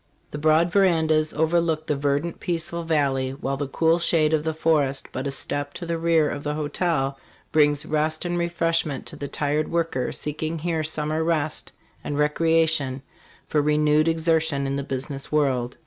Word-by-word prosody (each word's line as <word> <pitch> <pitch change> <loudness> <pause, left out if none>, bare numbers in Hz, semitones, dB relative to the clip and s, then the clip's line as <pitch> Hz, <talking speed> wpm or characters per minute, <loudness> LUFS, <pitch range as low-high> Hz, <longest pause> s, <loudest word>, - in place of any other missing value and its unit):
The 150 - -5
broad 155 +3 +3
verandas 160 -5 +3
overlook 160 0 +1
the 150 - 0
verdant, 145 +4 -1
peaceful 170 0 -2
valley, 140 -5 0
while 135 +1 -2
the 140 0 -3
cool 165 +4 +2
shade 160 -2 +3
of 155 -1 +2
the 160 - 0
forest 155 -4 +1
but 130 +2 -3
a - - -1
step 145 +1 -3
to 175 - -6
the 165 -1 -2
rear 165 -2 +3
of 145 - -4
the 150 0 -2
hotel 145 -3 -1 0.3
brings 150 -1 +3
rest 155 +2 -1
and 175 0 -1
refreshment 165 -4 0
to - - -6
the 140 - -5
tired 150 +2 -1
worker 165 -7 -1
seeking 155 +2 -3
here 160 0 -1
summer 155 +1 -1
rest 160 -2 -1 0.3
and 145 - -3
recre 150 +2 +1
ation 140 -4 -1 0.4
for 150 - +2
renewed 150 +1 +3
exertion 160 -3 +1
in 135 0 -1
the 140 - -1
business 135 +1 -5
world. 130 -5 0
155 Hz, 175 wpm, -24 LUFS, 145-165 Hz, 0.4 s, broad